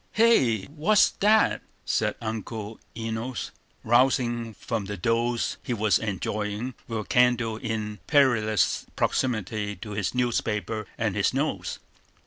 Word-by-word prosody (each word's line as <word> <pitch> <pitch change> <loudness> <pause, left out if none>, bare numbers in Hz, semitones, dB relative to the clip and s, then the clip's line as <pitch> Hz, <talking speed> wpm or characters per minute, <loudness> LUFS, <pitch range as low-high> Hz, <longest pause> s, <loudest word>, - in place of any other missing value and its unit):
"Hey! 135 - +4
what's 165 - +3
that?" 215 +1 +4 0.2
said - - 0
Uncle 110 -1 -5 0.2
Enos, 115 +2 -4 0.3
rousing 120 -2 +2
from 115 -4 -3
the 100 +1 -5
doze 115 +4 0
he 120 - -2
was 110 -1 +3
enjoying, 105 +3 -3
with 115 -2 -3
a - - -6
candle 120 -1 +2
in 110 -2 -4
perilous 115 - +3
proximity 110 -4 -1
to 105 +3 -8
his 105 +2 -2
newspaper 110 -3 -1
and - - -1
his - - +1
nose. - - -1
115 Hz, 120 wpm, -26 LUFS, 105-125 Hz, 0.3 s, Hey